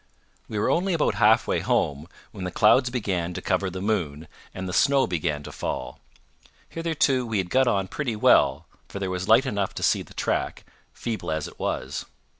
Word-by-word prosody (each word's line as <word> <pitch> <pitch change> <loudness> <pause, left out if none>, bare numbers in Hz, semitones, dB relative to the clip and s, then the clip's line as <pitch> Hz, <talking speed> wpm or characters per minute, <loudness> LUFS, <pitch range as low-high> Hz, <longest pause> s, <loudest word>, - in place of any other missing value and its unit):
We 110 - -5
were 105 - +1
only 185 +1 +1
about 150 - +1
halfway 110 +2 +3
home, 75 +2 0 0.2
when 100 -4 -8
the 90 - -2
clouds 115 +7 +4
began 95 -8 -2
to - - -3
cover 95 - 0
the 95 +1 -6
moon, 85 -8 -2 0.2
and 95 0 -6
the 90 - -4
snow 140 +4 +4
began 75 -4 -2
to - - -8
fall. 65 - -5 0.7
Hitherto 155 -6 +1
we 115 -3 -2
had 95 -2 -2
got 130 0 +3
on 100 -5 +1
pretty 120 +2 -3
well, 70 -6 +4 0.2
for - - -7
there 95 -1 -3
was 95 +1 -3
light 115 +5 +5
enough 100 -7 -2
to - - -4
see - - +3
the - - -13
track, - - -2 0.3
feeble 115 -2 -5
as 80 -1 -2
it - - -14
was. 65 +2 -3
100 Hz, 195 wpm, -25 LUFS, 85-120 Hz, 0.7 s, light